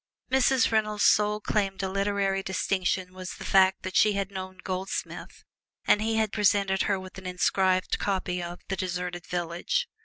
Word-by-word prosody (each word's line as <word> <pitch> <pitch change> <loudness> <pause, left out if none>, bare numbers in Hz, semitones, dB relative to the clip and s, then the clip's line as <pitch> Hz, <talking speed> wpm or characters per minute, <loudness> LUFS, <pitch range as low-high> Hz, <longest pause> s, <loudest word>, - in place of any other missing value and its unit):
Mrs. 265 -2 +3
Reynolds' 215 -1 +1
sole 210 0 +4
claim 200 -2 -1
to 195 - -2
literary 195 0 0
distinction 185 -1 -1
was 185 0 -7
the - - -9
fact 190 0 +4
that 185 - -5
she 210 - +5
had 200 0 -2
known 185 -1 -7
Goldsmith 190 +1 -5 0.4
and 210 - +4
he 225 +1 0
had 220 -2 0
presented 200 -2 +2
her 195 -2 +1
with 185 0 -10
an 190 - -8
inscribed 185 +1 +1
copy 185 -2 -1
of 175 0 -7
"The 195 - -2
Deserted 180 -1 -4
Village." 175 - -2
190 Hz, 165 wpm, -27 LUFS, 185-205 Hz, 0.4 s, she